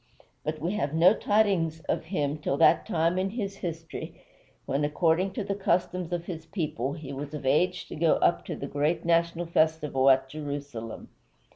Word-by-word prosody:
But 155 +1 -2
we 165 +4 -2
have 160 -8 -1
no 175 +5 +6
tidings 195 -8 +1
of - - -2
him 150 -4 -1
till 140 -2 -1
that 160 - +4
time 170 +2 +1
in 190 +1 0
his 200 -2 -4
history 165 -3 -6 0.5
when, 140 +2 0
according 165 +5 +2
to 205 - -3
the 200 0 -2
customs 180 -2 0
of 175 -1 -2
his 165 -3 -7
people, 150 - -2
he 150 -3 -7
was 145 +2 -6
of 145 - -7
age 175 +7 +2
to - - -6
go 160 +1 +3
up - - +2
to - - -4
the - - -5
great 150 +4 -1
national 170 0 +2
festival 155 -5 +2
at 135 0 +4
Jerusalem. 140 -5 -6
160 Hz, 180 wpm, -28 LUFS, 145-180 Hz, 0.5 s, no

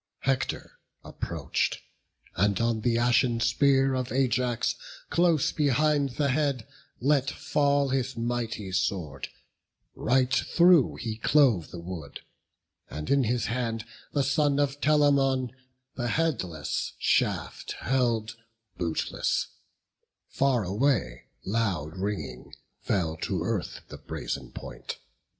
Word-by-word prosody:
Hector 135 -1 -2 0.2
approach'd, - - -2 0.6
and 100 +1 +2
on 115 -1 +1
the 115 +1 +2
ashen 120 0 +3
spear 135 +3 +3
Of 130 -1 -2
Ajax, 125 -2 +1 0.4
close 170 -4 +3
behind 145 -1 +2
the 145 -2 +2
head, 135 -4 0 0.3
let 140 0 +2
fall 145 -2 +1
His 130 -1 -1
mighty 115 -4 -2
sword; 90 -7 -2 0.7
right 130 +2 +1
through 170 0 +4
he 110 -2 -4
clove 120 - +3
the - - -8
wood; 85 -4 -7 0.7
And 75 0 -5
in 140 -2 +4
his 120 +2 0
hand 115 -2 -2 0.3
the 140 - +1
son 145 +1 +2
of 145 0 0
Telamon 140 -4 +3 0.4
The 120 -2 -3
headless 110 - -1
shaft - - 0
held 115 -4 0 0.4
bootless; 85 -2 -1 0.8
far 130 -4 +2
away, 100 - 0 0.2
Loud 95 -8 -1
ringing, 95 -10 -4 0.3
fell 80 -5 -1
to - - -2
earth - - -3
the - - -9
brazen - - -5
point. - - -7
125 Hz, 110 wpm, -27 LUFS, 105-140 Hz, 0.8 s, through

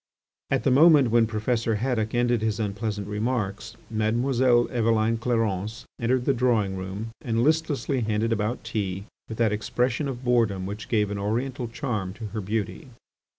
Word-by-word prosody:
At - - +1
the 135 - +3
moment 145 -3 +6
when 115 -1 +4
Professor 115 +1 0
Haddock 110 -1 -1
ended 120 -1 +2
his 110 0 -1
unpleasant 105 -1 -2
remarks, 105 0 -2
Mademoiselle 120 +3 +2
Eveline 115 -2 +2
Clarence 115 -1 -1
entered 125 +1 +1
the 140 - +3
drawing 115 -6 +1
room 95 +4 -5
and 115 0 0
listlessly 145 -3 +1
handed 110 +1 0
about 110 +2 -2
tea 100 -2 -3 0.2
with 110 - -6
that 110 -3 +2
expression 125 +6 -1
of 130 -2 -5
boredom 115 -7 +2
which 105 +3 -6
gave 105 -3 +1
an 100 - -3
oriental 120 +5 -2
charm 115 -6 -3
to 110 +2 -8
her 110 - -2
beauty. 110 - -3
115 Hz, 155 wpm, -25 LUFS, 105-125 Hz, 0.2 s, moment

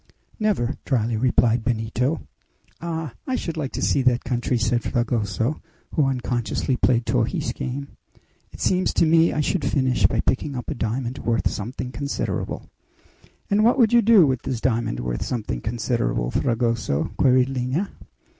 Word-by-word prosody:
"Never," 195 - +1
dryly 115 -3 0
replied 115 -1 +2
Benito. 120 +5 -1 0.6
"Ah! 160 -5 -4
I 260 - 0
should 165 -9 -3
like 145 -4 -3
to - - -3
see 140 - +2
that 125 -1 +2
country," 125 0 0
said 120 +1 +1
Fragoso, 120 +1 -1 0.3
who 145 -3 +3
unconsciously 125 0 -1
played 120 -1 +2
Torres' - - 0
game. 140 +2 -4 0.6
"It - - -12
seems 185 0 +1
to - - +4
me 165 +1 +4
I 150 - 0
should 160 +2 0
finish 130 -2 +2
by - - 0
picking 135 +2 -1
up 125 - -4
a - - 0
diamond 120 +3 -3
worth 115 -1 0
something 125 +4 -5
considerable." 140 +2 -3 0.8
"And 205 +1 +4
what 240 +4 +4
would 235 -3 +4
you 240 - +7
do 215 -5 +6
with 130 -3 0
this 125 - -3
diamond 115 - 0
worth - - -3
something 105 - -3
considerable, 115 - -1
Fragoso?" 115 - 0
queried 130 0 +4
Lina. 135 +9 -2
125 Hz, 155 wpm, -23 LUFS, 115-145 Hz, 0.8 s, you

